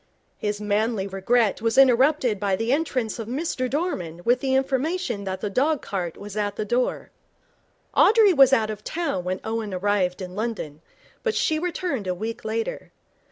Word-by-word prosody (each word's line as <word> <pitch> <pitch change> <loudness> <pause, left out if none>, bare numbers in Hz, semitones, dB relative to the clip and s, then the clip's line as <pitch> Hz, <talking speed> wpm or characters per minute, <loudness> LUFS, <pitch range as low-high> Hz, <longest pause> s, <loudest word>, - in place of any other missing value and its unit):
His 210 0 -2
manly 210 0 0
regret 200 +4 +1
was 230 +2 0
interrupted 260 -3 +4
by 200 -1 +1
the 225 +5 0
entrance 255 -8 -1
of 225 - -5
Mr 255 -1 -2
Dorman 185 - -3
with 245 +1 +3
the 265 0 0
information 265 - -1
that 190 0 -4
the 210 - -2
dog 280 +6 +1
cart 180 -4 -4
was 205 0 -9
at 205 -1 -1
the 215 - -3
door. 245 +4 -1 0.8
Audrey 430 -3 +6
was 270 -4 +6
out 220 -5 +2
of 210 -1 -8
town 325 - -2
when 185 +1 -2
Owen 220 -3 -3
arrived 190 -1 0
in 185 -1 -7
London, 205 -9 -4 0.4
but 455 -2 -1
she 310 0 +1
returned 340 - -2
a 180 - -1
week 220 +5 -5
later. 220 +1 -3
225 Hz, 170 wpm, -24 LUFS, 200-270 Hz, 0.8 s, Audrey